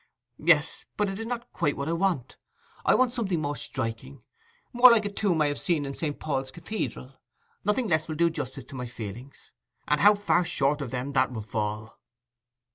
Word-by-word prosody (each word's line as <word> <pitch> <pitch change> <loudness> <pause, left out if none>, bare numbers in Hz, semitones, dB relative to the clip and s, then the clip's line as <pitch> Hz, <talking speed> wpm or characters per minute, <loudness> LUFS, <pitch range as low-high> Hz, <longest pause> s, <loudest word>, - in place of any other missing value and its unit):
'Yes, 155 -1 +3
but 210 -1 +1
it 195 +1 -5
is 225 - -4
not 240 0 -5
quite 145 - 0
what 140 +1 -3
I 165 - 0
want. 170 -8 0 0.5
I - - +4
want 255 -2 +3
something 200 -9 -1
more 145 -1 -2
striking—more 240 - 0
like 225 -3 +4
a 205 - -2
tomb 195 -5 0
I - - +2
have 145 -1 -1
seen 160 -5 +1
in 140 - -4
St. 145 0 -3
Paul's 135 -3 -2
Cathedral. 135 -7 -5 0.4
Nothing 210 +4 +1
less 155 -4 +1
will 155 - -4
do 170 +1 +3
justice 130 -5 -5
to - - -12
my 125 -1 -4
feelings, 120 +3 -9 0.4
and 150 0 +2
how 205 +1 +7
far 200 -3 +2
short 145 -2 0
of 135 - -4
them 130 +3 -3
that 130 -2 +2
will 110 -3 -5
fall! 105 0 -4
150 Hz, 195 wpm, -27 LUFS, 130-205 Hz, 0.5 s, how